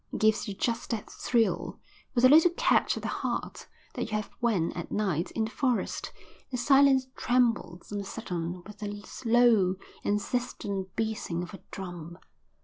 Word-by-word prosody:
It - - -3
gives 215 0 +3
you 200 - -4
just 230 +4 -1
that 225 -4 -3
thrill, 225 -7 0 0.4
with 245 +1 +5
a - - +11
little 320 +5 +8
catch - - +3
at - - -6
the - - -1
heart, - - -3 0.3
that - - -2
you - - -7
have 210 - -5
when 215 -9 +1
at 170 - -6
night 190 -5 0
in 220 - +1
the 220 - -6
forest 255 -3 -1 0.4
the 255 - -3
silence 270 +1 +5
trembles 230 -9 0
on 205 - -2
a - - -3
sudden 180 -4 -4
with 210 +1 -11
the 205 -1 -6 0.2
low, 225 -6 +5 0.3
insistent 205 -3 -2
beating 215 -6 -2
of 180 - -9
a 195 - -8
drum. 175 -3 -7
210 Hz, 170 wpm, -29 LUFS, 185-240 Hz, 0.4 s, a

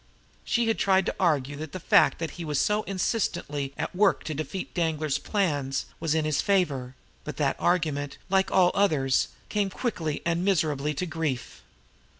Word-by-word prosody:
She 235 -1 +1
had 225 - +1
tried 190 -1 +3
to - - -2
argue 145 -6 +1
that 155 0 -7
the 185 - -4
fact - - +4
that 165 -1 -4
he 175 - -7
was 150 -3 -1
so 210 +1 +2
insistently 180 - -1
at - - -4
work 200 +1 +3
to 155 - -4
defeat 155 +6 -5
Danglar's 155 -4 0
plans 145 -10 -1
was 160 -1 0
in 160 -1 +1
his 155 -2 +1
favor; 140 -10 0 0.3
but - - -6
that - - +1
argument, 150 -5 0
like 190 0 +2
all 180 -1 +4
others, 150 -10 +2 0.2
came 205 -2 0
quickly 170 - -3
and 170 +1 0
miserably 150 -6 +1
to 180 - -2
grief. 155 -6 -3
160 Hz, 170 wpm, -27 LUFS, 145-190 Hz, 0.3 s, fact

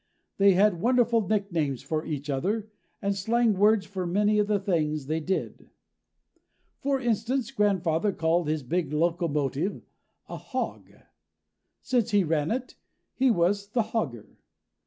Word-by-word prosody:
They 195 0 +6
had 190 -2 +3
wonderful 235 -3 +2
nicknames 170 - -1
for 155 -1 -2
each 145 -2 -5
other, 200 +10 -2 0.3
and 200 0 0
slang 225 +3 +2
words 205 +1 +3
for 185 -3 -4
many 210 +4 +2
of 205 - +2
the 210 -1 +1
things 155 -7 -1
they 155 +3 -1
did. 185 +4 -4 1.1
For 275 -1 0
instance, 240 +1 -1
grandfather 190 -2 +1
called 165 -1 0
his 155 -1 -1
big 160 +3 -1
locomotive 165 0 -1 0.4
a - - -6
hog. - - -5 0.9
Since 245 -4 +1
he 205 -2 +3
ran 155 -2 0
it, 255 +2 -3 0.4
he 265 0 +2
was 200 0 +1
the 230 +3 0
hogger. 130 - -3
195 Hz, 135 wpm, -27 LUFS, 160-215 Hz, 1.1 s, They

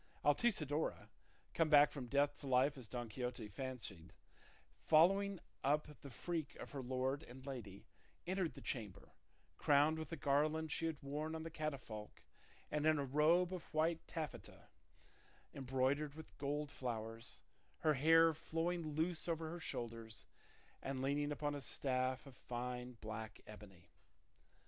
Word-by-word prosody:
Altisidora, 150 - +2 0.4
come 165 -2 +3
back 145 -1 +8
from 130 -4 -5
death 140 +3 +3
to 140 - -6
life 130 +2 +4
as 130 -5 -7
Don 120 +1 -4
Quixote 125 0 -4
fancied, 110 -6 -6 0.7
following 195 +4 +5 0.2
up 150 +1 +1
the 140 - -8
freak 160 +3 -3
of - - -8
her 140 - -4
lord 130 +2 0
and 130 +2 -11
lady, 110 -8 -7 0.4
entered 185 -2 0
the - - -9
chamber, 105 -6 -5 0.5
crowned 150 +2 +5
with 160 - -5
the 165 - -3
garland 155 +2 +2
she 165 - 0
had 160 -2 -2
worn 150 +3 -2
on 160 - -4
the 165 - -6
catafalque 135 -9 -5 0.5
and 150 +1 +1
in 155 -1 +5
a 140 - 0
robe 165 +7 +4
of 180 -3 -6
white 160 +1 +2
taffeta 155 -2 -6 0.8
embroidered 135 +2 0
with 160 0 -11
gold 145 +1 -1
flowers, 115 -4 -5 0.4
her 155 - +4
hair 165 +3 +6
flowing 165 0 -2
loose 160 +2 0
over 160 -1 -1
her 175 - -5
shoulders, 115 -6 -5 0.6
and 135 -1 -3
leaning 145 +2 +1
upon 145 0 -1
a 145 - -4
staff 130 -1 0
of 135 -2 -12
fine 125 +1 -4
black 110 0 -5
ebony. 100 -5 -13
145 Hz, 145 wpm, -39 LUFS, 125-160 Hz, 0.8 s, back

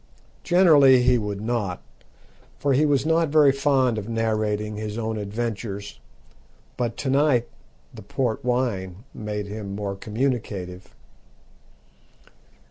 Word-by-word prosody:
Generally 145 -8 +6
he 125 -1 +4
would 105 -2 -4
not, 110 -5 -2 0.8
for 140 -1 +1
he 150 +4 +3
was 140 -1 +1
not 160 0 +2
very 150 -2 +5
fond 135 -4 +1
of 105 +2 -7
narrating 110 -2 -1
his 105 0 -5
own 110 -1 -2
adventures, 105 -1 -5 0.8
but 120 -2 -2
to 140 - -3
night 135 -4 +3 0.5
the 115 - -10
port 115 +3 -2
wine 115 -6 -2
made 105 -1 -4
him 100 -1 -6
more 100 -1 -4
communicative. 105 -5 -4
115 Hz, 120 wpm, -24 LUFS, 105-130 Hz, 0.8 s, Generally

